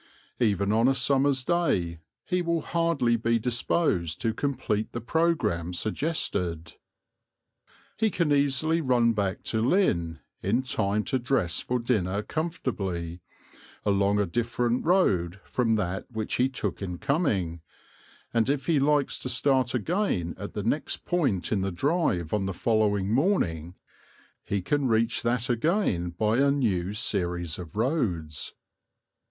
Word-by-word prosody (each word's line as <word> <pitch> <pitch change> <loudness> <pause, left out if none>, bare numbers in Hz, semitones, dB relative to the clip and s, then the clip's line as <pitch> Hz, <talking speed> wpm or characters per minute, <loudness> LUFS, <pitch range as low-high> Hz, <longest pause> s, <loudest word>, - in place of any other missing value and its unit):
Even 100 -4 +2
on 115 +3 +4
a 135 - +3
summer's 135 +1 +2
day 95 - 0 0.3
he 180 0 0
will 170 -1 0
hardly 165 -8 +1
be 115 +1 +1
disposed 115 - 0
to 115 - 0
complete 125 -5 -2
the 120 - -3
programme 115 - 0
suggested. 90 - -2 1.2
He 220 - +2
can 170 -6 0
easily 145 +3 +2
run 120 -4 +3
back 100 -3 -2
to 110 - -1
Lynn, 100 - +2 0.2
in 115 +7 +1
time 105 -4 0
to 130 +3 -1
dress 120 -9 0
for 125 - -1
dinner 105 -5 0
comfortably, 95 - -3 0.6
along 100 0 +2
a 100 - +2
different 120 +5 -1
road 100 - +2
from 115 -3 +1
that 95 -1 -2
which 110 -2 -3
he 125 +2 +3
took 105 -9 -4
in 90 -3 -4
coming, 100 - 0 0.7
and 115 +1 +2
if 140 -1 0
he 160 -4 +3
likes 145 0 +1
to 130 - -4
start 130 -1 +2
again 125 - 0
at 100 - -7
the 105 - -3
next 130 +8 -2
point 140 - 0
in 100 - +1
the 95 0 -1
drive 95 - 0
on 100 -2 0
the 95 - -3
following 105 -2 +1
morning, 90 - +1 0.7
he 100 -2 -2
can 145 +6 +1
reach 115 0 +2
that 120 0 0
again 120 - +1
by 105 +6 0
a 140 0 +4
new 100 -10 0
series 90 -5 -1
of 85 -4 -9
roads. 100 - -1
115 Hz, 140 wpm, -27 LUFS, 95-140 Hz, 1.2 s, on